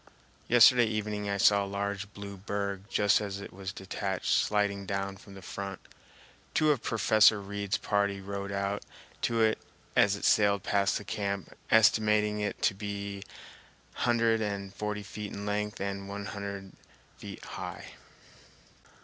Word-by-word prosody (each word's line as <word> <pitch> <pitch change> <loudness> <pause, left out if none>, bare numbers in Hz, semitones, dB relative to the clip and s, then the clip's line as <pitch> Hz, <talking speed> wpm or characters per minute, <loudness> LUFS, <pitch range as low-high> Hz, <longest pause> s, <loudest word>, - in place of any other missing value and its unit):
Yesterday 120 +1 +7
evening 105 -1 -2
I 100 - 0
saw 100 0 +5
a - - -4
large 100 0 -3
blue 100 0 -7
berg 100 0 -3
just 105 0 +3
as 100 -1 -4
it 100 - -9
was 95 0 -5
detached 95 0 -3
sliding 100 -2 +1
down 100 -1 -2
from 100 0 -14
the 95 - -11
front. 100 0 -5 0.8
Two 155 -1 +4
of 140 -6 0
Professor 110 -1 +4
Reid's 100 0 -2
party 100 -1 0
rowed 100 0 -5
out 100 +1 -1 0.4
to 115 -1 +1
it 110 0 +3 0.4
as 100 -1 +5
it 100 - -4
sailed 100 -2 +4
past 100 -1 +2
the - - -7
camp, 100 -1 -3
estimating 105 -1 +4
it 105 0 -3
to - - +4
be 100 0 -5
two 100 - -12 0.6
hundred 115 -2 +2
and 100 -2 -3
forty 105 -1 -3
feet 105 0 -7
in 100 - -5
length 105 0 -2
and 100 0 -4
one 100 0 -5
hundred 100 -1 -6 0.5
feet - - -9
high. - - -7
100 Hz, 155 wpm, -30 LUFS, 100-105 Hz, 0.8 s, Yesterday